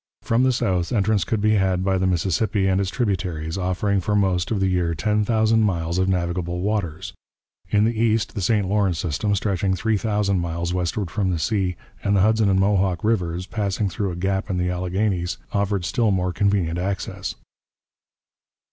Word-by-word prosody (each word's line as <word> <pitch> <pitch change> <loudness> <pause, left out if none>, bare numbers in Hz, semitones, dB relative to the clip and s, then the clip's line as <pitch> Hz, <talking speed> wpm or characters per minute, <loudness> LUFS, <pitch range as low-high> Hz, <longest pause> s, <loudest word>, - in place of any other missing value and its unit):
From 115 +2 +2
the 130 0 +4
south, 90 -8 0
entrance 105 -4 +2
could 105 +4 -1
be 110 +1 +3
had 95 -3 +1
by 95 -1 +1
the 95 - +1
Mississippi 95 +3 +1
and 95 0 +2
its 95 - -1
tributaries, 90 - -2
offering 95 +1 0
for 105 +3 -1
most 95 -3 +1
of 110 - 0
the 95 - +2
year 90 -3 0
ten 105 +6 +1
thousand 110 0 +2
miles 85 -4 0
of 95 +1 +1
navigable 90 -1 -1
waters. 90 -4 -2 0.6
In 105 0 +3
the 115 +1 0
east 115 -2 +1
the 100 - -4
St 100 +1 +1
Lawrence 100 -3 +1
system, 90 +6 -1
stretching 95 -1 0
three 110 +2 0
thousand 105 -2 0
miles 85 0 -2
westward 90 0 -2
from 100 -3 0
the 90 - 0
sea, 90 +2 0 0.3
and 100 0 +2
the 95 - +4
Hudson 110 0 +3
and 95 0 +3
Mohawk 95 -3 +1
rivers, 90 -5 0
passing 100 -1 -1
through 100 +2 -2
a 90 - -4
gap 95 +3 -1
in 90 - -1
the 90 0 0
Alleghanies, 90 0 -1 0.2
offered 100 -2 0
still 105 +7 +1
more 90 -2 0
convenient 95 -4 +1
access. 95 +1 -3
95 Hz, 185 wpm, -23 LUFS, 90-105 Hz, 0.6 s, the